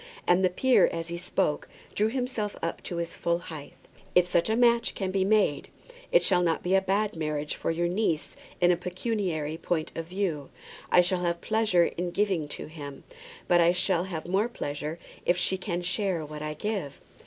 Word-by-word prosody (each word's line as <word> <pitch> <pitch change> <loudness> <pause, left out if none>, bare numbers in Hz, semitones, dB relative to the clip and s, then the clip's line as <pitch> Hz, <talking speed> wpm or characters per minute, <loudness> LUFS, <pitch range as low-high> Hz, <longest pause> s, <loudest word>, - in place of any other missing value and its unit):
And 175 +2 +4
the 185 - +5
peer 255 +8 +4
as 165 0 -4
he 170 - -3
spoke 180 -4 -1 0.3
drew 210 - +2
himself 245 -3 -2
up 165 - -2
to 175 - -4
his 170 0 -3
full 170 0 0
height. 155 -4 -9 0.4
"If 180 - +6
such 175 +1 +1
a 220 - +2
match 235 0 +3
can 190 -2 -2
be 190 0 +1
made, 200 -7 +2 0.4
it - - +5
shall 180 -2 +3
not 165 -2 +1
be 180 - 0
a 195 - +5
bad 200 +2 0
marriage 150 -2 -2
for - - -3
your 170 +1 +1
niece 175 -4 -1 0.2
in 175 0 +5
a - - +4
pecuniary 180 -4 -2
point 165 -2 -2
of 165 0 -5
view. 175 -6 -2 0.4
I 180 - +7
shall 180 0 0
have 170 -1 0
pleasure 215 -4 +3
in 175 +1 -3
giving 190 -5 0
to - - -6
him; 145 -3 -9 0.4
but 175 -1 +5
I 170 +1 +5
shall 180 -1 +1
have 170 -4 -5
more 195 +6 +1
pleasure 150 -5 -4 0.3
if 175 - +2
she 180 +1 +1
can 180 -2 -3
share 180 -3 0
what 150 0 -8
I 150 0 -4
give." 195 -6 -3
175 Hz, 200 wpm, -28 LUFS, 165-195 Hz, 0.4 s, I